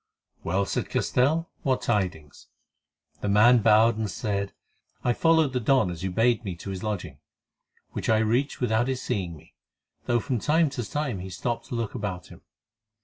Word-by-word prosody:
"Well," 95 +4 0
said - - -2
Castell, 155 +7 +1
"what 130 -2 0
tidings?" 90 -9 -2 0.7
The 105 - -2
man 115 +5 +6
bowed 110 +1 +5
and 110 -2 -1
said: 100 +2 -2 0.5
"I 120 - +2
followed 160 -2 +3
the 125 - +1
Don 125 -5 +2
as 85 -1 -7
you 95 - -2
bade 115 +4 +2
me 95 -5 -4
to 95 +3 -7
his 95 -1 -5
lodging, 90 -10 -4 0.7
which - - -4
I 110 - +5
reached 115 +6 0
without 120 0 +1
his 130 -1 -1
seeing 90 -9 -3
me, 80 - -20 0.5
though 120 0 +2
from 125 0 -2
time 155 +4 +2
to 120 -5 -5
time 140 -9 -2
he 95 +1 -7
stopped 115 +7 -3
to - - -5
look 115 -3 -2
about 100 -6 -5
him. - - -14
110 Hz, 180 wpm, -26 LUFS, 95-125 Hz, 0.7 s, man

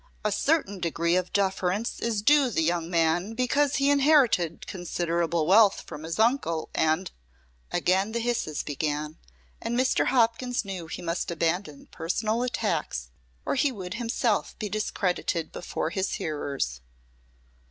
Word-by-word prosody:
A 210 - +2
certain 205 - +1
degree 170 0 0
of 180 0 0
deference 195 +2 0
is 225 -3 -1
due 285 0 +5
the 175 -8 0
young 170 0 0
man 175 +5 +1
because 280 +3 +2
he 280 +1 +3
inherited 270 - +3
considerable 170 -2 -1
wealth 200 +3 +5
from 150 - -9
his 160 +1 -4
uncle, 220 - +1
and 160 +4 +1 0.3
" - - -36
Again 190 +4 +1
the 235 - -2
hisses 230 -11 -1
began, 150 +1 -3 0.4
and 240 +1 -2
Mr. 255 +1 +2
Hopkins 245 -1 +1
knew 185 -4 -5
he 160 - -6
must 170 +1 -2
abandon 170 -1 -2
personal 215 +7 -2
attacks 65 - -2 0.3
or - - 0
he 280 +1 +2
would 185 -6 -6
himself 230 -2 -1
be 210 - -4
discredited 180 -5 -1
before 165 -2 -3
his 190 +1 -1
hearers. 140 - -3
185 Hz, 140 wpm, -27 LUFS, 165-230 Hz, 0.4 s, due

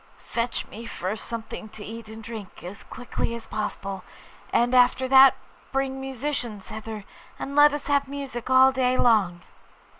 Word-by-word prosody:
'Fetch 235 0 -2
me 225 - -10
first 195 +2 -4
something 225 -1 -6
to 210 -1 -10
eat 225 0 -8
and 220 0 -9
drink, 220 -3 -9
as 185 +4 -8
quickly 240 -1 -4
as 230 -1 -8
possible; 200 -3 -4 0.5
and 240 +1 +2
after 250 +1 +4
that 265 +1 +8 0.4
bring 270 0 -1
musicians 260 -6 -4
hither, 220 -1 -6 0.3
and 280 - -5
let 295 0 +8
us 290 0 -4
have 285 -1 +2
music 270 -4 -6
all 260 +1 +7
day 255 -1 +1
long. 195 -7 +3
235 Hz, 155 wpm, -25 LUFS, 215-265 Hz, 0.5 s, that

